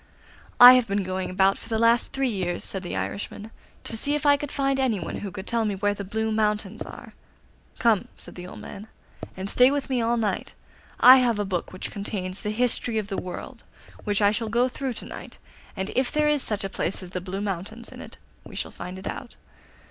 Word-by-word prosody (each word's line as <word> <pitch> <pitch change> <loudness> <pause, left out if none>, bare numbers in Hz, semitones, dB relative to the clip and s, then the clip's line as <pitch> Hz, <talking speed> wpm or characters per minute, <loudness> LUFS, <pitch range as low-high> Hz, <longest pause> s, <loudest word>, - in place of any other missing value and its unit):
'I 245 +1 +12
have 250 -2 +3
been 200 0 0
going 185 0 -3
about 190 +1 +3
for - - -11
the 225 - 0
last 230 +1 +3
three 270 0 0
years,' 185 -6 -2
said 190 - -3
the 175 - -5
Irishman, 205 +2 -5 0.3
'to - - -4
see 285 +6 +1
if 295 0 -2
I 285 0 +7
could 285 0 -5
find 275 -1 0
anyone 225 -10 -1
who 205 - -5
can 190 0 -8
tell 230 0 0
me 210 -2 -1
where 205 +1 +1
the 200 - -6
Blue 220 +3 -2
Mountains 210 -1 0
are.' - - -11 0.6
'Come 225 -4 +4
in,' - - -15
said - - -9
the 180 0 -8
old - - -10
man, 205 +2 -9 0.5
'and 190 +1 -4
stay 250 +5 +5
with 280 -1 -2
me 250 -2 +2
all 235 +1 +1
night. 210 -4 -2 0.4
I 255 +1 +10
have 245 -4 +2
a 205 - -1
book 185 -3 -3
which 185 - -6
contains 200 -2 -4
the 210 - -3
history 235 +1 0
of 210 -2 -2
the 195 - -3
world, 180 - -8 0.4
which 205 -1 +1
I 205 - +6
shall 220 +1 -2
go 240 +3 +3
through 260 0 -4
to - - -7
night, - - -9 0.4
and 190 +2 -3
if 260 0 +1
there 300 0 +2
is 300 -2 +2
such 210 -5 -1
a - - -1
place 190 0 -2
as 180 - -10
the 180 - -3
Blue 190 +1 -5
Mountains 205 +4 -4
in - - -10
it - - -11 0.3
we - - -12
shall - - -3
find 180 +1 -7
it 190 - -10
out. - - -6
215 Hz, 230 wpm, -25 LUFS, 195-245 Hz, 0.6 s, I